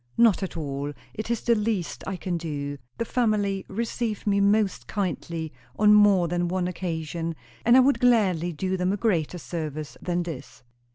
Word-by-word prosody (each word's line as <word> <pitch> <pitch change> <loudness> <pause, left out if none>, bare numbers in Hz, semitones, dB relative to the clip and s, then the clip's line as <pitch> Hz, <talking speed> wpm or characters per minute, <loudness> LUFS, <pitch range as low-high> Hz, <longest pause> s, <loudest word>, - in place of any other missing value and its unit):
"Not 230 -5 +5
at 190 -3 -4
all. 145 -1 -3 0.2
It 215 +1 -5
is 235 -1 0
the 235 - +3
least 210 -5 -1
I 195 - -2
can 180 -1 -3
do. 145 -4 -4 0.2
The 230 - -1
family 210 -5 0
received 225 +1 -3
me 200 -1 +2
most 200 - +2
kindly 170 -5 -3 0.2
on 210 0 +6
more 205 -4 +6
than 175 +1 0
one 180 0 -1
occasion; 165 -2 -3 0.3
and 240 +2 +6
I - - +8
would 275 +2 +3
gladly 195 -9 +3
do 185 +4 -2
them 180 +1 +1
a 205 - 0
greater 180 -6 0
service 155 -3 -5
than 175 -1 -1
this." 135 -7 -8
185 Hz, 175 wpm, -26 LUFS, 165-210 Hz, 0.3 s, I